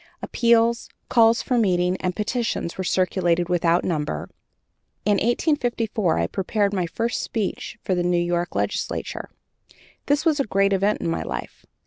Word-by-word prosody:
Appeals, 235 Hz, 0 st, +2 dB, 0.2 s
calls 230 Hz, -1 st, +4 dB
for 250 Hz, -2 st, +1 dB
meetings, 180 Hz, -3 st, +2 dB
and 180 Hz, -1 st, -2 dB
petitions 220 Hz, -5 st, -2 dB
were 190 Hz, -, -3 dB
circulated 180 Hz, -2 st, +1 dB
without 175 Hz, 0 st, +2 dB
number. 150 Hz, -, -2 dB, 0.7 s
In 205 Hz, 0 st, +3 dB
1854 235 Hz, -, 0 dB
I -, -, +1 dB
prepared 200 Hz, +1 st, -1 dB
my 180 Hz, -3 st, 0 dB
first 230 Hz, +8 st, -2 dB
speech 220 Hz, +2 st, -3 dB
for 190 Hz, -, 0 dB
the 180 Hz, -, +1 dB
New 175 Hz, 0 st, +1 dB
York 175 Hz, 0 st, -1 dB
legislature. -, -, -3 dB, 0.8 s
That 290 Hz, +3 st, +1 dB
was 310 Hz, -3 st, +3 dB
a -, -, +3 dB
great 195 Hz, -1 st, +2 dB
event 200 Hz, +2 st, +1 dB
in -, -, -2 dB
my 165 Hz, -, -1 dB
life. -, -, -6 dB
195 Hz, 150 wpm, -23 LUFS, 175-230 Hz, 0.8 s, calls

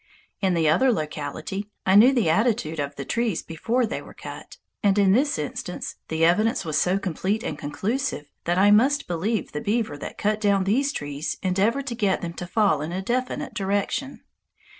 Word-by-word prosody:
In 190 Hz, -3 st, +2 dB
the 165 Hz, -2 st, +2 dB
other 250 Hz, +13 st, +4 dB
locality, 155 Hz, +3 st, -4 dB, 0.2 s
I 190 Hz, -, +3 dB
knew 220 Hz, +6 st, +8 dB
the 240 Hz, -9 st, +1 dB
attitude 195 Hz, -3 st, +1 dB
of 145 Hz, 0 st, -3 dB
the 140 Hz, -, -6 dB
trees 230 Hz, -, -1 dB
before 230 Hz, +10 st, 0 dB
they 225 Hz, -, -4 dB
were -, -, -13 dB
cut, -, -, -9 dB, 0.2 s
and 200 Hz, -2 st, +3 dB
in 200 Hz, -2 st, +5 dB
this 275 Hz, +8 st, +2 dB
instance 155 Hz, +4 st, -5 dB
the 160 Hz, 0 st, +1 dB
evidence 210 Hz, +4 st, +2 dB
was 155 Hz, -2 st, -2 dB
so 180 Hz, +2 st, +2 dB
complete 195 Hz, +3 st, -2 dB
and -, -, -3 dB
conclusive 200 Hz, -, -2 dB, 0.2 s
that 175 Hz, +1 st, +1 dB
I 200 Hz, +2 st, +5 dB
must 270 Hz, +7 st, +4 dB
believe 190 Hz, +6 st, -1 dB
the 150 Hz, -, -4 dB
beaver 210 Hz, -8 st, -1 dB
that -, -, -7 dB
cut 210 Hz, +1 st, 0 dB
down 200 Hz, -2 st, +3 dB
these 260 Hz, +9 st, +1 dB
trees 145 Hz, -, -4 dB
endeavored 200 Hz, +9 st, +1 dB
to 255 Hz, -, -3 dB
get 205 Hz, -5 st, 0 dB
them 170 Hz, -1 st, -4 dB
to 180 Hz, -, -6 dB
fall 200 Hz, -6 st, +2 dB
in 155 Hz, +3 st, -4 dB
a 180 Hz, -, -2 dB
definite 255 Hz, +6 st, -2 dB
direction. 205 Hz, +7 st, -2 dB
200 Hz, 190 wpm, -24 LUFS, 165-230 Hz, 0.2 s, knew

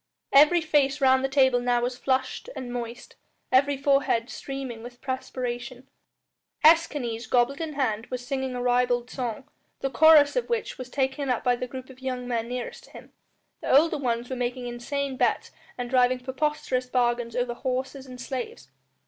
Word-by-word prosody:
Every 305 Hz, +5 st, +7 dB
face 290 Hz, -3 st, +2 dB
round 260 Hz, -1 st, +4 dB
the 270 Hz, -, 0 dB
table 260 Hz, -2 st, +4 dB
now 245 Hz, 0 st, +1 dB
was 250 Hz, +1 st, -1 dB
flushed 260 Hz, -, -1 dB
and 245 Hz, -1 st, -6 dB
moist; 240 Hz, -1 st, -7 dB, 0.3 s
every 275 Hz, +2 st, +3 dB
forehead 275 Hz, -4 st, +1 dB
streaming 270 Hz, -4 st, -6 dB
with 245 Hz, +1 st, -11 dB
perspiration. 255 Hz, -1 st, -5 dB, 0.8 s
Escanes, 270 Hz, -8 st, +3 dB
goblet 250 Hz, +4 st, +2 dB
in 320 Hz, -2 st, -4 dB
hand, 230 Hz, -5 st, -1 dB
was 250 Hz, -1 st, -5 dB
singing 265 Hz, -1 st, -3 dB
a 245 Hz, -, -3 dB
ribald 245 Hz, 0 st, +1 dB
song, 245 Hz, -1 st, -4 dB, 0.4 s
the 270 Hz, -, -1 dB
chorus 300 Hz, +2 st, +6 dB
of -, -, -1 dB
which 470 Hz, -, -2 dB
was 255 Hz, 0 st, -7 dB
taken 265 Hz, +1 st, -1 dB
up 250 Hz, -, 0 dB
by 245 Hz, 0 st, +3 dB
the 250 Hz, +1 st, -5 dB
group 260 Hz, +1 st, -8 dB
of 260 Hz, 0 st, -17 dB
young 255 Hz, -1 st, -4 dB
men 230 Hz, -2 st, -1 dB
nearest 250 Hz, -1 st, -5 dB
to -, -, -20 dB
him. -, -, -13 dB, 0.5 s
The 265 Hz, -, +4 dB
older 315 Hz, 0 st, +3 dB
ones 240 Hz, -2 st, -1 dB
were 260 Hz, -, -4 dB
making 250 Hz, 0 st, -3 dB
insane 260 Hz, +3 st, -3 dB
bets -, -, +1 dB, 0.3 s
and 245 Hz, -1 st, -3 dB
driving 250 Hz, 0 st, +2 dB
preposterous 260 Hz, -1 st, -1 dB
bargains 240 Hz, -2 st, 0 dB
over 245 Hz, -1 st, 0 dB
horses 260 Hz, +2 st, -4 dB
and 250 Hz, -1 st, -10 dB
slaves. 240 Hz, -, -6 dB
255 Hz, 175 wpm, -26 LUFS, 245-275 Hz, 0.8 s, Every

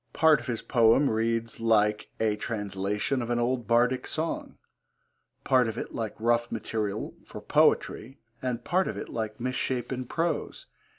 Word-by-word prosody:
Part 160 Hz, -3 st, +5 dB
of 120 Hz, -, -10 dB
his 120 Hz, -3 st, -3 dB
poem 120 Hz, +3 st, +4 dB
reads 115 Hz, +1 st, -1 dB
like 105 Hz, -2 st, +2 dB
a 110 Hz, -2 st, +2 dB
translation 105 Hz, +3 st, -2 dB
of 120 Hz, -, -4 dB
an 120 Hz, -, +1 dB
old 120 Hz, -1 st, 0 dB
Bardic 120 Hz, +2 st, +2 dB
song, 160 Hz, +1 st, -3 dB, 0.9 s
part 130 Hz, -2 st, +4 dB
of 110 Hz, 0 st, -4 dB
it -, -, -5 dB
like 110 Hz, -2 st, -3 dB
rough 120 Hz, +1 st, +1 dB
material 110 Hz, -1 st, -3 dB
for -, -, -9 dB
poetry, 130 Hz, +5 st, +1 dB, 0.2 s
and 125 Hz, -2 st, -2 dB
part 185 Hz, +2 st, +1 dB
of -, -, -4 dB
it -, -, -6 dB
like 110 Hz, -2 st, -4 dB
misshapen 130 Hz, +1 st, -2 dB
prose. 165 Hz, +4 st, -2 dB
115 Hz, 155 wpm, -28 LUFS, 110-130 Hz, 0.9 s, Part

